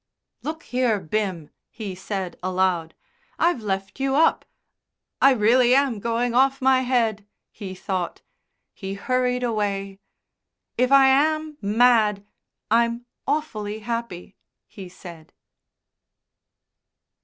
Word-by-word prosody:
"Look 320 +1 -5
here, 245 -4 0
Bim," 185 -3 -3 0.2
he 210 -4 -7
said 190 0 -5
aloud, 180 -3 0 0.4
"I've 340 -8 +1
left 195 +1 -4
you 270 0 0
up 325 +3 +3 0.8
I 270 - +7
really 245 +2 +4
am 270 -5 +2
going 235 +2 -1
off 270 +2 +3
my 265 0 +4
head!" 230 -5 0 0.2
he 190 -2 -8
thought. 185 -2 -4 0.5
He 195 -1 -6
hurried 250 +3 0
away. 200 -4 -2 0.8
"If 250 +2 +1
I 275 -1 +7
am 305 +3 +2
mad 215 -1 +3 0.5
I'm 235 +1 +2 0.2
awfully 220 -8 -2
happy," 230 -7 -5 0.3
he 190 -3 -11
said. 170 -3 -13
225 Hz, 110 wpm, -23 LUFS, 195-255 Hz, 0.8 s, I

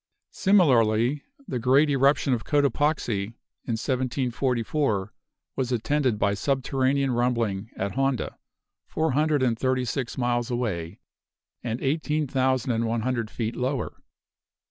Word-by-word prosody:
Similarly, 130 - +3 0.3
the 125 - -2
great 130 +5 +4
eruption 135 0 +3
of 115 -3 -1
Cotopaxi, 145 -7 +1 0.4
in 120 - -2
1744, 125 -3 -1 0.4
was 130 -2 -2
attended 125 0 +1
by 100 -1 +1
subterranean 135 +3 0
rumbling 115 -4 0
at 100 +1 -2
Honda, 135 -2 -1 0.5
four 160 -1 0
hundred 150 0 +2
and 115 -3 +1
thirty 130 -1 +1
six 125 0 -3
miles 120 -1 0
away, 100 -8 -3 0.6
and 115 +1 -3
eighteen 150 +2 0
thousand 130 -1 +1
and 115 0 0
one 115 0 -1
hundred 115 -2 -1
feet 115 0 -3
lower. 130 -1 -3
125 Hz, 120 wpm, -25 LUFS, 115-140 Hz, 0.6 s, great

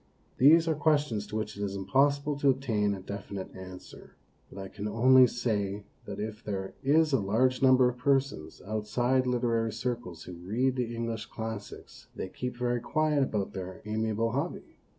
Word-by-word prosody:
These 160 +5 +7
are 160 - +3
questions 145 -8 +1
to - - -7
which 110 0 -3
it 100 - -7
is 100 -1 -3
impossible 140 +9 +2
to 140 - +4
obtain 110 -7 +1
a 95 - -8
definite 100 0 -7
answer; 95 -1 -11 0.3
but - - -13
I 95 0 -5
can 105 +2 -6
only 125 +4 +6
say 105 -4 -2 0.2
that 100 0 -6
if 105 +1 -5
there 95 -2 -4
is 150 +2 +3
a 135 - +4
large 120 +7 +1
number 130 -1 +6
of 125 0 -3
persons 135 - 0
outside 120 +5 0
literary 115 -2 +1
circles 115 -7 -4
who 90 - -9
read 110 +10 -1
the 120 -2 -2
English 115 -1 -3
ii - - -25
classics, 110 -2 -7
they 95 - -5
keep 125 +4 -5
very 120 0 0
quiet 155 +3 +1
about 105 -7 -1
their 95 -1 -7
amiable 110 +1 -1
hobby. 140 +8 -4
115 Hz, 175 wpm, -29 LUFS, 100-130 Hz, 0.3 s, These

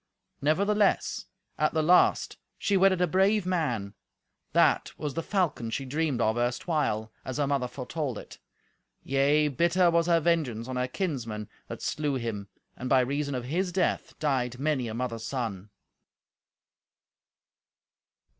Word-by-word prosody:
Nevertheless, 200 +8 +1 0.3
at 155 +1 +1
the 155 - +2
last, 180 +3 +4 0.2
she 200 - 0
wedded 190 -1 +4
a - - +3
brave 195 +3 +3
man; 125 - -1 0.6
that - - +3
was 150 -2 -3
the 165 - -2
falcon 165 - -1
she 135 +4 -3
dreamed 145 -1 -1
of 110 0 +2
erstwhile, 120 -3 -1
as 130 - -5
her 145 - +2
mother 140 -2 0
foretold 130 0 -4
it. - - -11 0.6
Yea, 140 +3 +3
bitter 170 +5 +3
was 170 0 +2
her 170 -1 +4
vengeance 150 -9 0
on 130 - -4
her 125 0 0
kinsmen 120 - -3 0.2
that - - -7
slew 150 -2 -1
him, 115 -5 -4 0.3
and 125 - -5
by 130 0 +5
reason 140 +2 -1
of 125 -1 -4
his 180 +7 -1
death 180 0 -1
died 130 -5 0
many 140 -3 0
a 110 - -5
mother's 115 -2 -3
son. 110 -7 -4
140 Hz, 145 wpm, -28 LUFS, 125-170 Hz, 0.6 s, by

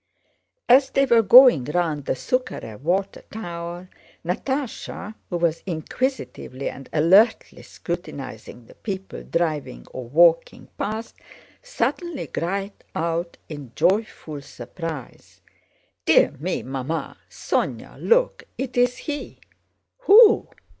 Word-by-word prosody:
As 265 +2 +6
they 275 - +2
were 235 -3 +5
going 235 - +8
round 150 -2 -1
the - - 0
Súkharev 130 - -3
water 190 +6 -1
tower 175 -3 -6 0.4
Natásha, 220 - -3 0.2
who 175 - -1
was 170 -1 0
inquisitively 165 - -3
and 135 - -12
alertly 190 +9 +3
scrutinizing 135 -9 -7
the - - -16
people 195 -3 -6
driving 155 - -2
or 130 - -7
walking 165 +3 +3
past, 220 +2 -4 0.4
suddenly 350 - -2
cried 195 +4 -3 0.2
out 170 +1 -2
in 145 -6 -9
joyful 185 -7 0
surprise: 145 +2 -8 0.7
"Dear - - +5
me! - - -2
Mamma, 135 +5 -4
Sónya, - - -3
look, - - +2
it's 245 -1 0
he!" 295 -2 -6 0.6
"Who? 445 -2 +7
175 Hz, 105 wpm, -23 LUFS, 155-245 Hz, 0.7 s, going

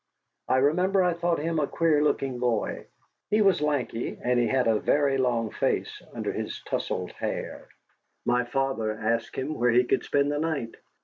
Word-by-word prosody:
I 130 - +3
remember 180 +8 +3
I 180 -1 +2
thought 170 0 0
him 165 +1 -1
a 145 - +1
queer 160 -3 +2
looking 135 -4 0
boy. 120 -3 -1 0.4
He 215 0 +3
was 195 -6 +3
lanky, 140 -6 -1
and 125 0 +1
he 120 - +2
had 130 +1 +2
a 110 -2 +3
very 140 -2 +2
long 120 -3 0
face - - -1
under - - -3
his - - -4
tousled - - -3
hair. - - -5 0.6
My 125 0 +2
father 135 -4 -1
asked 115 +1 -2
him 135 +4 -2
where 125 -4 +1
he 120 +1 +5
could 125 - 0
spend 145 0 +1
the 145 - -1
night. 155 -7 -2
135 Hz, 180 wpm, -27 LUFS, 120-155 Hz, 0.6 s, he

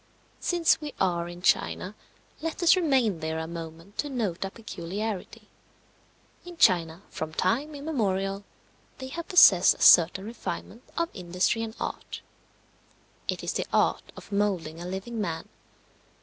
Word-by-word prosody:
Since 345 -2 +2
we 295 -2 -6
are 175 -2 0
in 175 +1 -10
China, 185 +1 +1 0.5
let 325 +3 -3
us 345 - +7
remain 265 - +2
there 160 0 -3
a 160 - -3
moment 165 +3 -9
to 290 - -1
note 215 -11 -2
a 195 - -3
peculiarity. 200 0 -6 1.0
In 355 -1 -11
China, 175 - +3
from 160 0 -5
time 270 +11 0
immemorial, 200 -10 -1 0.5
they 260 -1 -7
have 335 +4 -6
possessed 195 - +7
a - - -15
certain 175 +3 +7
refinement 230 0 -6 0.2
of 335 0 0
industry 180 +5 0
and 225 0 -5
art. - - -5 1.1
It - - -2
is - - -2
the - - -2
art - - +1
of - - -12
moulding 185 -6 -1
a 175 - -6
living 200 +5 -4
man. 165 -5 -3
195 Hz, 145 wpm, -27 LUFS, 175-260 Hz, 1.1 s, us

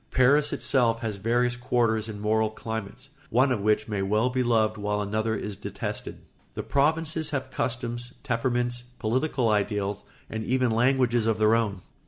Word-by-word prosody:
Paris 140 +4 +4
itself 115 -4 +1
has 110 -3 -3
various 120 +4 +1
quarters 115 -3 0
and 105 -2 -6
moral 110 +1 +1
climates, 110 +4 -6 0.2
one 130 +4 +3
of 115 -5 0
which 105 +1 +2
may 105 -3 -2
well 105 +6 +1
be 130 0 0
loved 110 -3 +2
while 105 0 -2
another 110 +2 -1
is 105 0 -4
detested. 100 - -6 0.3
The - - -3
provinces 160 +2 +1
have 140 -3 -3
customs, 120 0 -3
temperaments, 120 -1 0 0.2
political 130 +2 0
ideals, 105 -1 0 0.2
and 110 0 -4
even 130 0 +1
languages 120 -1 +2
of 110 -1 +2
their 110 +1 +4
own. 105 -5 0
115 Hz, 160 wpm, -26 LUFS, 110-125 Hz, 0.3 s, Paris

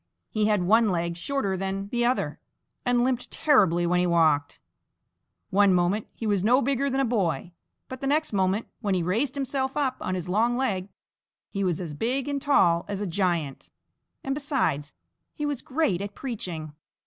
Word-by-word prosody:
He 215 -1 +1
had 210 -4 +2
one 220 +4 +4
leg 170 -2 -1
shorter 200 +2 -1
than 195 +1 -3
the 240 +1 0
other, 255 - -1 0.4
and 245 -1 +2
limped 250 -1 -1
terribly 190 - +3
when 180 +1 +2
he 180 - +2
walked. 155 -4 +2 0.9
One 200 -1 +5
moment 180 +4 +1
he 225 - -6
was 200 -3 +1
no 245 +5 +5
bigger 275 +1 0
than 265 0 0
a 270 - +3
boy, 180 - -1 0.4
but 260 0 -8
the 275 - -1
next 305 -2 +1
moment 195 +2 +1
when 205 -5 0
he 180 - 0
raised 230 +11 0
himself 270 -1 -2
up 265 -3 0
on 185 - -2
his 180 -2 -4
long 230 +6 +2
leg 200 -8 -1 0.6
he 200 -1 -2
was 180 -4 0
as 170 -5 -5
big 250 - -1
and 285 -1 -2
tall 175 -13 +3
as 200 -1 -3
a 205 - -2
giant 170 -6 -1 0.5
and 270 - -1
besides 270 - -1 0.4
he 295 - -3
was 290 -3 -2
great 260 - 0
at 200 0 -6
preaching. 175 - -5
205 Hz, 185 wpm, -26 LUFS, 180-260 Hz, 0.9 s, One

